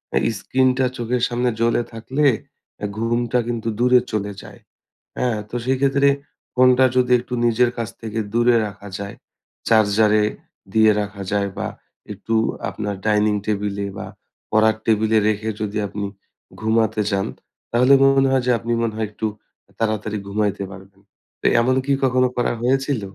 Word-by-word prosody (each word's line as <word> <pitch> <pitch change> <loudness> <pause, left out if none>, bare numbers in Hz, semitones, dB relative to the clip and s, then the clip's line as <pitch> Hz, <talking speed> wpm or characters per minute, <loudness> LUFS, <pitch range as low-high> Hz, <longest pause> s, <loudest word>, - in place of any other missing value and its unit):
এ - - +4
স্ক্রিনটা 130 +5 +1
চোখের 120 +1 -1
সামনে 125 +1 0
জ্বলে 115 +1 +2
থাকলে 130 +6 -1 0.5
অ্যা 105 - -3
ঘুমটা 120 +2 0
কিন্তু 115 -2 -3
দূরে 125 +1 +5
চলে 105 -2 -2
যায়, - - -13 0.6
হ্যাঁ? 120 -3 0
তো - - -7
সেইক্ষেত্রে 135 +2 +2 0.5
ফোনটা 130 0 +5
যদি 125 -1 +2
একটু 125 +1 -8
নিজের 120 +1 +3
কাছ 115 -2 -3
থেকে 110 0 -4
দূরে 120 +1 +4
রাখা 100 0 -11
যায়, 100 0 -6 0.5
চার্জারে 110 -1 +4 0.5
দিয়ে 110 -1 +5
রাখা 105 -1 -6
যায় 100 -1 0
বা - - -2 0.5
একটু 105 +3 -3 0.3
আপনার 105 -1 -4
ডাইনিং 105 0 +3
টেবিলে 100 -1 -2
বা 95 - -6 0.4
পড়ার 110 0 +4
টেবিলে 110 0 +2
রেখে 110 +1 -1
যদি 105 0 -2
আপনি 100 +1 -4 0.6
ঘুমাতে 110 0 +1
যান, 95 -1 0 0.4
তাহলে 125 +3 +5
মনে 135 0 +4
হয় 130 -1 +2
যে - - +4
আপনি 115 - -4
মনে 115 -2 -1
হয় 110 -1 -1
একটু 110 +1 -3 0.5
তাড়াতাড়ি 110 -1 -1
ঘুমাইতে 100 0 -1
পারবেন। 95 0 -14 0.4
তো - - -12 0.2
এমন 130 +2 +2
কি 140 - -1
কখনো 130 -1 +3
করা 120 - +1
হয়েছিল? 135 0 +1
110 Hz, 150 wpm, -21 LUFS, 105-125 Hz, 0.6 s, দূরে